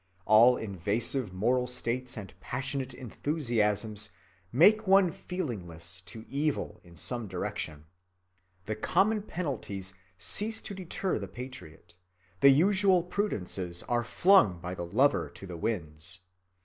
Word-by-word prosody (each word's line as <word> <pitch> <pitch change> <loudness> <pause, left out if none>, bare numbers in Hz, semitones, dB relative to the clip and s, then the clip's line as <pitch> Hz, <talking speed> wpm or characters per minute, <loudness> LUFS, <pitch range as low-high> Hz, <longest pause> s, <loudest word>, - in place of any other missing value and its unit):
All 115 +4 +7
invasive 105 +4 -1
moral 125 +7 +1
states 125 0 -2
and 100 -3 -7
passionate 130 0 -3
enthusiasms 115 -6 -1 0.4
make 210 - +5
one 190 -2 +6
feelingless 90 - -5
to 110 +6 -8
evil 145 +2 -2
in 85 -1 -16
some 120 +2 -3
direction. 80 -4 -4 0.8
The 110 - -2
common 210 - +2
penalties 120 - -4 0.2
cease 210 - 0
to - - -5
deter 185 0 -2
the - - -5
patriot, 105 -10 -10 0.4
the 140 - +8
usual 190 +4 +4
prudences 95 - -2
are 120 -1 +1
flung 115 - +4
by 90 +1 -5
the 85 -2 -5
lover 130 +11 +3
to - - -9
the 90 -2 -7
winds. 85 -2 -2
120 Hz, 125 wpm, -30 LUFS, 95-150 Hz, 0.8 s, the